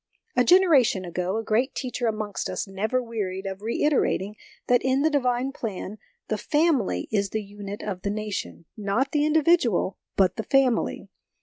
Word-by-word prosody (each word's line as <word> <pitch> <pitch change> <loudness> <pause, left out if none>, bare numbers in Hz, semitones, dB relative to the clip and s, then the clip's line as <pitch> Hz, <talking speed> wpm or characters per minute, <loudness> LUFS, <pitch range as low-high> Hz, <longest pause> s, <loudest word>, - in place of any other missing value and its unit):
A 250 - +4
generation 280 - +4
ago, 180 +3 -2
a 225 - -2
great 235 +5 0
teacher 245 -2 -2
amongst 215 -2 -3
us - - -3
never 215 +6 -1
wearied 200 -5 -4
of 195 0 -5
reiterating 225 -4 0 0.3
that 245 0 +3
in 265 +2 +2
the 315 - +3
Divine 255 -2 +1
plan 210 -4 -6
" - - -47
the 215 - -2
family 295 - +1
is 200 -2 +1
the 220 +1 -3
unit 205 0 -8
of 190 -3 -4
the 200 - -2
nation 210 -5 -4
": - - -65
not 215 +6 -1
the 295 -1 +2
individual, 305 - +2 0.2
but 190 -2 +2
the 220 - -2
family. 265 -2 +1
220 Hz, 175 wpm, -25 LUFS, 200-265 Hz, 0.3 s, A